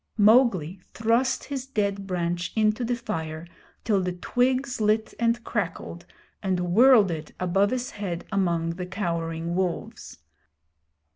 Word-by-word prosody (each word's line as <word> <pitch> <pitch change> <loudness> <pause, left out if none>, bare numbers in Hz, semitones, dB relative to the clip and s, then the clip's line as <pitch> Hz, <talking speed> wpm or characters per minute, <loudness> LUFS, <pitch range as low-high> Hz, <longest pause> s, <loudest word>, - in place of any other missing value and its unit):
Mowgli 205 - +4 0.2
thrust 235 +4 +1
his 270 -2 -5
dead 200 -5 -2
branch 175 -1 -2
into 215 +2 +2
the 240 +1 0
fire 160 -8 -5 0.4
till 205 -4 +2
the 180 -1 -2
twigs 255 +6 0
lit 215 +1 +1
and 235 0 +1
crackled, 175 -5 -4 0.3
and 180 -3 -1
whirled 230 -4 +6
it 155 -2 -6
above 195 +3 +2
his 250 +1 -3
head 180 -4 -5
among 170 -4 0
the 180 -1 -4
cowering 170 -3 -3
wolves. 180 -1 -3
195 Hz, 130 wpm, -25 LUFS, 175-230 Hz, 0.4 s, whirled